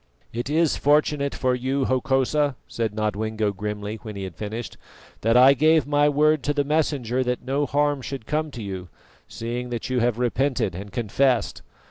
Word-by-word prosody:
"It 120 Hz, +4 st, -3 dB
is 160 Hz, +1 st, +2 dB
fortunate 145 Hz, -1 st, +2 dB
for 130 Hz, -1 st, +1 dB
you, 130 Hz, +2 st, -1 dB
Hokosa," 135 Hz, +2 st, +1 dB
said 115 Hz, -2 st, -2 dB
Nodwengo 110 Hz, 0 st, -1 dB
grimly 105 Hz, +1 st, -4 dB
when 110 Hz, -1 st, -9 dB
he 100 Hz, -, -5 dB
had 95 Hz, -4 st, -7 dB
finished, 110 Hz, +5 st, -5 dB, 0.5 s
"that 115 Hz, +2 st, +3 dB
I 130 Hz, +2 st, +8 dB
gave 155 Hz, +3 st, +4 dB
my 145 Hz, 0 st, +3 dB
word 150 Hz, +1 st, +3 dB
to 145 Hz, -, 0 dB
the 145 Hz, -, +2 dB
Messenger 140 Hz, -5 st, 0 dB
that 125 Hz, 0 st, -2 dB
no 140 Hz, +2 st, 0 dB
harm 145 Hz, 0 st, +1 dB
should 130 Hz, -2 st, -6 dB
come 155 Hz, +3 st, -1 dB
to 120 Hz, -6 st, -8 dB
you, 95 Hz, -3 st, -6 dB, 0.4 s
seeing 120 Hz, +2 st, -5 dB
that 120 Hz, +1 st, -4 dB
you 125 Hz, -, +1 dB
have 120 Hz, -1 st, +1 dB
repented 125 Hz, -4 st, 0 dB
and 100 Hz, +3 st, -8 dB
confessed. 120 Hz, +3 st, 0 dB
125 Hz, 175 wpm, -24 LUFS, 110-145 Hz, 0.5 s, I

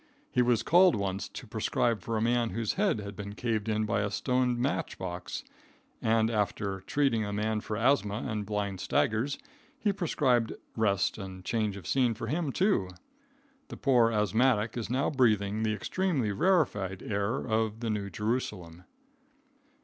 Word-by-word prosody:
He 125 Hz, -, +3 dB
was 120 Hz, -2 st, +2 dB
called 180 Hz, -2 st, +6 dB
once 95 Hz, -1 st, -2 dB
to -, -, -8 dB
prescribe 115 Hz, -4 st, 0 dB
for 115 Hz, +4 st, -2 dB
a -, -, 0 dB
man 120 Hz, 0 st, +2 dB
whose 115 Hz, -2 st, -1 dB
head 195 Hz, -, +1 dB
had 100 Hz, 0 st, -7 dB
been 100 Hz, 0 st, -7 dB
caved 110 Hz, -3 st, -1 dB
in 110 Hz, 0 st, +1 dB
by 105 Hz, -1 st, 0 dB
a 105 Hz, -, 0 dB
stone 125 Hz, +1 st, 0 dB
match 130 Hz, +3 st, -1 dB
box, 90 Hz, -1 st, -5 dB, 0.6 s
and, 110 Hz, 0 st, +2 dB
after 100 Hz, -2 st, -1 dB
treating 135 Hz, +1 st, +1 dB
the 105 Hz, -1 st, -2 dB
man 105 Hz, +1 st, -1 dB
for 105 Hz, -, -4 dB
asthma 115 Hz, -3 st, +1 dB
and 105 Hz, -3 st, -2 dB
blind 100 Hz, -2 st, -3 dB
staggers, 120 Hz, +6 st, +1 dB, 0.4 s
he 205 Hz, -2 st, +1 dB
prescribed 130 Hz, -, +1 dB, 0.2 s
rest 105 Hz, -2 st, +1 dB
and 95 Hz, -1 st, -8 dB
change 110 Hz, -3 st, -1 dB
of 100 Hz, -, -10 dB
scene 125 Hz, -4 st, +2 dB
for -, -, -5 dB
him, 160 Hz, -2 st, -1 dB
too. 180 Hz, -, +1 dB, 0.8 s
The -, -, -8 dB
poor 120 Hz, -5 st, +4 dB
asthmatic 110 Hz, +1 st, +2 dB
is 115 Hz, -3 st, -4 dB
now 130 Hz, +5 st, +1 dB
breathing 110 Hz, -6 st, +2 dB
the 110 Hz, -1 st, +1 dB
extremely 150 Hz, -, -1 dB
rarified 105 Hz, -, +1 dB
air 100 Hz, +3 st, -1 dB
of 110 Hz, -3 st, -1 dB
the 115 Hz, -2 st, -1 dB
New 100 Hz, -2 st, -2 dB
Jerusalem. 95 Hz, -5 st, -3 dB
110 Hz, 165 wpm, -29 LUFS, 100-125 Hz, 0.8 s, called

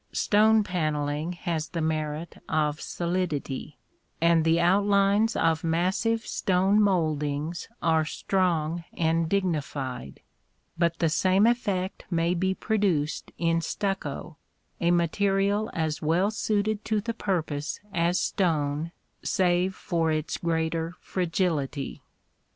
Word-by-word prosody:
Stone 215 Hz, +1 st, +4 dB
panelling 155 Hz, -2 st, -1 dB
has 170 Hz, -3 st, -3 dB
the 170 Hz, -, -4 dB
merit 155 Hz, 0 st, -3 dB
of 150 Hz, -1 st, 0 dB
solidity, 170 Hz, -5 st, -3 dB, 0.4 s
and 170 Hz, -1 st, +4 dB
the 165 Hz, +1 st, +3 dB
outlines 200 Hz, +4 st, +3 dB
of 160 Hz, -1 st, +1 dB
massive 185 Hz, +7 st, +1 dB
stone 190 Hz, +3 st, +2 dB
mouldings 155 Hz, -4 st, 0 dB, 0.2 s
are 160 Hz, -1 st, +3 dB
strong 170 Hz, 0 st, 0 dB
and 165 Hz, 0 st, +1 dB
dignified; 145 Hz, -, -2 dB, 0.5 s
but 170 Hz, -1 st, +1 dB
the 165 Hz, -, +2 dB
same 185 Hz, +5 st, +3 dB
effect 200 Hz, -6 st, 0 dB
may 170 Hz, -1 st, +1 dB
be 190 Hz, +2 st, 0 dB
produced 190 Hz, -10 st, 0 dB
in 165 Hz, -1 st, +1 dB
stucco, 170 Hz, -4 st, -3 dB, 0.4 s
a 170 Hz, -, +2 dB
material 195 Hz, +4 st, +1 dB
as 160 Hz, -2 st, -2 dB
well 175 Hz, +7 st, +2 dB
suited 215 Hz, -1 st, -1 dB
to 215 Hz, -1 st, 0 dB
the 230 Hz, +3 st, -3 dB
purpose 160 Hz, -9 st, -2 dB
as 170 Hz, +2 st, +2 dB
stone, 155 Hz, -3 st, 0 dB, 0.3 s
save 185 Hz, -2 st, +1 dB
for 165 Hz, -2 st, 0 dB
its 155 Hz, 0 st, -2 dB
greater 165 Hz, 0 st, -1 dB
fragility. 165 Hz, -6 st, -2 dB
170 Hz, 110 wpm, -27 LUFS, 155-195 Hz, 0.5 s, Stone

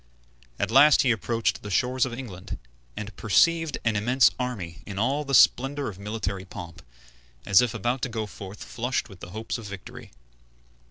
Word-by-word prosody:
At 100 Hz, +1 st, -1 dB
last 145 Hz, +4 st, +7 dB
he 130 Hz, -, +3 dB
approached 115 Hz, +1 st, -1 dB
the 105 Hz, -, -7 dB
shores 125 Hz, +5 st, +1 dB
of 120 Hz, -, -7 dB
England, 105 Hz, -8 st, -7 dB, 0.4 s
and 105 Hz, 0 st, -6 dB
perceived 165 Hz, +8 st, +3 dB
an 115 Hz, -2 st, +2 dB
immense 120 Hz, +5 st, +4 dB
army 95 Hz, -11 st, -4 dB
in 100 Hz, -2 st, -6 dB
all 135 Hz, +8 st, +1 dB
the 140 Hz, -1 st, 0 dB
splendor 135 Hz, +3 st, +4 dB
of 100 Hz, -2 st, -10 dB
military 100 Hz, -2 st, -4 dB
pomp, 85 Hz, -2 st, -9 dB, 0.6 s
as 100 Hz, +2 st, +6 dB
if 120 Hz, -3 st, -1 dB
about 120 Hz, +4 st, -1 dB
to 130 Hz, -, -1 dB
go 110 Hz, -2 st, -3 dB
forth 100 Hz, 0 st, -9 dB
flushed 125 Hz, +1 st, -3 dB
with 95 Hz, -3 st, -14 dB
hopes 110 Hz, +6 st, -5 dB
of 110 Hz, -, -8 dB
victory. 100 Hz, -2 st, -10 dB
115 Hz, 170 wpm, -26 LUFS, 100-125 Hz, 0.6 s, last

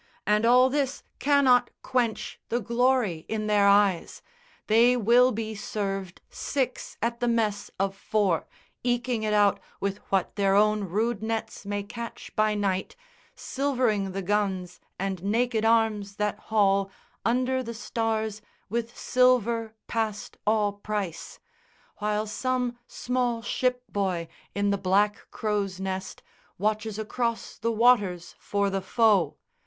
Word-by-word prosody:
and 210 Hz, +2 st, +3 dB
all 250 Hz, +2 st, +6 dB
this 275 Hz, 0 st, -1 dB, 0.2 s
cannot 265 Hz, -4 st, +4 dB
quench 235 Hz, -5 st, -1 dB
The 240 Hz, -, +1 dB
glory 235 Hz, -6 st, +1 dB
in 215 Hz, -1 st, -2 dB
their 205 Hz, -1 st, +4 dB
eyes. 200 Hz, -3 st, +3 dB, 0.4 s
They 235 Hz, +3 st, +5 dB
will 245 Hz, +3 st, +5 dB
be 220 Hz, -1 st, -3 dB
served 195 Hz, -3 st, -4 dB
Six 260 Hz, -3 st, -3 dB
at 235 Hz, 0 st, -1 dB
the 240 Hz, -, 0 dB
mess 215 Hz, -3 st, 0 dB
of 195 Hz, 0 st, 0 dB
four, 200 Hz, -4 st, 0 dB, 0.4 s
eking 245 Hz, -1 st, 0 dB
it 215 Hz, -1 st, -1 dB
out 205 Hz, -1 st, +4 dB, 0.2 s
With 200 Hz, 0 st, -2 dB
what 195 Hz, 0 st, 0 dB
their 195 Hz, -1 st, +3 dB
own 210 Hz, 0 st, +3 dB
rude 215 Hz, +4 st, -1 dB
nets 220 Hz, -2 st, -4 dB
may 205 Hz, 0 st, -2 dB
catch 235 Hz, +3 st, -8 dB
by 215 Hz, 0 st, +2 dB
night, 195 Hz, -2 st, -1 dB, 0.4 s
Silvering 250 Hz, -8 st, 0 dB
the 195 Hz, 0 st, -3 dB
guns 190 Hz, -2 st, -1 dB, 0.2 s
and 190 Hz, -2 st, -3 dB
naked 225 Hz, +2 st, +1 dB
arms 220 Hz, -3 st, +2 dB
that 210 Hz, 0 st, -1 dB
haul 200 Hz, -2 st, +3 dB, 0.3 s
Under 255 Hz, +3 st, +1 dB
the 235 Hz, -2 st, -6 dB
stars 220 Hz, -2 st, -2 dB, 0.3 s
with 235 Hz, +2 st, -3 dB
silver 235 Hz, -3 st, +2 dB
past 220 Hz, -2 st, -3 dB
all 210 Hz, -2 st, +2 dB
price, 205 Hz, -4 st, -4 dB, 0.6 s
While 210 Hz, 0 st, -1 dB
some 250 Hz, +2 st, -1 dB
small 245 Hz, -2 st, -1 dB
ship 250 Hz, +1 st, 0 dB
boy 185 Hz, -5 st, -2 dB, 0.3 s
in 200 Hz, 0 st, +1 dB
the 200 Hz, -, 0 dB
black 200 Hz, +2 st, +1 dB
crow's 205 Hz, -3 st, -2 dB
nest 190 Hz, 0 st, -4 dB, 0.3 s
Watches 215 Hz, +1 st, -1 dB
across 230 Hz, +2 st, -3 dB
the 230 Hz, +1 st, 0 dB
waters 210 Hz, -7 st, +3 dB
for 200 Hz, -1 st, 0 dB
the 195 Hz, 0 st, -1 dB
foe. 200 Hz, -6 st, +2 dB
215 Hz, 135 wpm, -27 LUFS, 200-235 Hz, 0.6 s, all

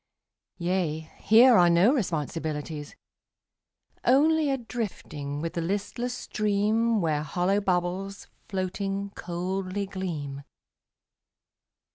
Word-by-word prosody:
Yea, 170 Hz, -3 st, -1 dB, 0.2 s
here 235 Hz, +4 st, +7 dB
are 175 Hz, -4 st, +6 dB
no 175 Hz, +9 st, +5 dB
responsibilities. 155 Hz, -, -3 dB, 1.1 s
Only 305 Hz, +3 st, +4 dB
a 270 Hz, -, +1 dB
drifting 160 Hz, -, -5 dB
with 165 Hz, 0 st, -3 dB
the 170 Hz, -, -2 dB
listless 205 Hz, +7 st, -2 dB
stream 215 Hz, +2 st, +1 dB
Where 155 Hz, -3 st, +1 dB
hollow 180 Hz, +6 st, 0 dB
bubbles, 190 Hz, +1 st, -1 dB, 0.2 s
floating, 195 Hz, +1 st, -2 dB
coldly 185 Hz, +2 st, -3 dB
gleam. 160 Hz, -8 st, -5 dB
190 Hz, 90 wpm, -27 LUFS, 165-210 Hz, 1.1 s, here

